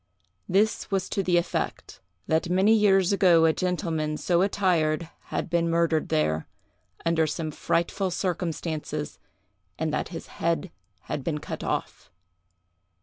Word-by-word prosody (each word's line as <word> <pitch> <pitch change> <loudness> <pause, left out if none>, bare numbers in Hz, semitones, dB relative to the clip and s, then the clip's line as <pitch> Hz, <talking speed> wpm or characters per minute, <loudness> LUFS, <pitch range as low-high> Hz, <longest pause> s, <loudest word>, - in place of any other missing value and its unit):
This 210 +4 +2
was 195 -2 0
to 195 - 0
the 180 -2 +2
effect, 170 0 -3 0.2
that 160 +2 +1
many 190 +5 +4
years 195 -3 +4
ago 175 -4 +5
a 160 - +4
gentleman 165 -4 -1
so 175 +1 +2
attired 170 -5 +1 0.2
had - - -3
been 170 0 +1
murdered 165 -1 +1
there, 80 +1 0 0.6
under 165 -1 +2
some 155 +1 -3
frightful 170 +5 0
circumstances, 165 -4 -3 0.6
and 160 -1 -1
that - - -1
his 165 - -7 0.2
head 170 +1 0 0.3
had 140 - -4
been 155 +1 -1
cut - - -6
off. - - -4
170 Hz, 135 wpm, -26 LUFS, 160-185 Hz, 0.6 s, ago